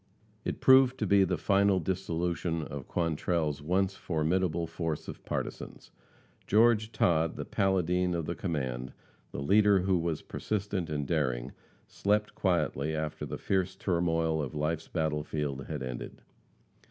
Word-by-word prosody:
It - - -4
proved 130 -1 +6
to 110 - -1
be 100 0 +5
the 90 -1 0
final 100 +4 +3
dissolution 85 -2 -2
of 70 -3 -7
Quantrell's 80 -2 -1
once 95 +5 +1
formidable 85 +1 0
force 80 -1 -4
of - - -8
partisans. - - -5 0.6
George 110 +1 +4
Todd, 80 -5 +2
the - - -5
Paladine 90 -2 +1
of 85 -2 -2
the 85 - -2
command, 65 -9 -3 0.4
the 70 - -4
leader 100 +3 +5
who 95 -1 +2
was 85 -2 -2
persistent 100 -5 -3
and 75 -2 -2
daring, 65 -5 -1 0.4
slept 105 +1 0
quietly 80 -6 0
after 80 -1 -3
the - - -5
fierce 95 -1 0
turmoil 80 -4 0
of 70 +1 -5
life's 75 +2 -1
battlefield 75 -3 -2
had 75 -4 -4
ended. 65 -1 -6
85 Hz, 140 wpm, -30 LUFS, 75-95 Hz, 0.6 s, proved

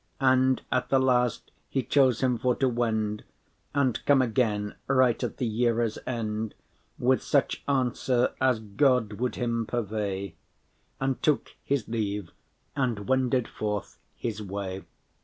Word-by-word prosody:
And 130 -1 +3
at - - 0
the 135 - +4
last 125 -2 +1 0.2
he 135 - 0
chose 130 -5 +3
him 125 -3 +2
for 125 -1 +2
to 135 - +1
wend,* 110 -3 0
*depart - - -19 0.6
And 125 - -2
come 145 -1 +6
again, 110 -4 +1
right 130 -3 +3
at - - -3
the 125 - -1
yeare’s 115 0 +1
end, 110 -3 -3 0.4
With 130 +1 +2
such 140 - +1
answer 130 -2 +1
as 130 -3 +3
God 115 0 +2
would 125 0 -1
him 115 -2 -1
purvey:* 100 -6 -3 0.6
*provide 135 - -2
And 135 -1 -1
took 150 -2 +1
his 140 -5 -1
leave, 105 -5 -2 0.4
and 115 -7 -1
wended 130 -2 +2
forth 105 -1 -4 0.2
his 110 -3 -3
way. 95 -1 -5
120 Hz, 145 wpm, -27 LUFS, 105-130 Hz, 0.6 s, come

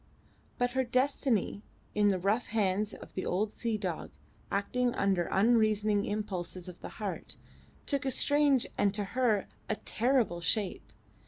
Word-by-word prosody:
But 245 0 +1
her 260 +1 +1
destiny 255 -4 +1 0.3
in 210 -1 +4
the 190 - +2
rough 200 +6 +1
hands 210 -1 0
of - - -12
the 185 - -3
old 205 +4 0
sea 230 -2 -1
dog, 185 -6 -4 0.4
acting 245 +5 0
under 190 -3 +1
unreasoning 215 -1 +3
impulses 185 -4 -4
of 180 -1 -10
the - - -6
heart, - - -5 0.5
took 280 -1 0
a 270 - 0
strange 285 0 +3
and 200 0 +3
to 210 - 0
her 240 -6 +2 0.2
a 215 - +1
terrible 230 -7 +1
shape. 195 +2 -1
215 Hz, 150 wpm, -31 LUFS, 195-245 Hz, 0.5 s, in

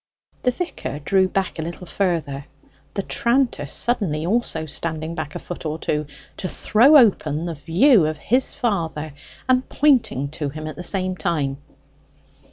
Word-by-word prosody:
The 250 - +2
vicar 250 - -4
drew 190 +6 +2
back 185 -2 -2
a - - 0
little 170 +3 -6
further, 160 -8 -1 0.5
the 200 - -1
tranter 235 - +1
suddenly 165 - -1
also 185 -5 0
standing 160 +1 -3
back 155 -3 -5
a - - -1
foot 175 - -7
or 155 -1 -2
two, 150 -2 -2 0.3
to 185 - -3
throw 265 +8 +5
open 170 - +3
the 170 - -3
view 170 - +4
of 155 0 -3
his 255 +10 +1
father, 165 - -2 0.3
and 255 0 +2
pointing 230 - +2
to 150 -1 -3
him 155 +2 -7
at 155 -2 -5
the 175 - -7
same 185 0 -1
time. 145 -6 -1
170 Hz, 160 wpm, -22 LUFS, 155-220 Hz, 0.5 s, throw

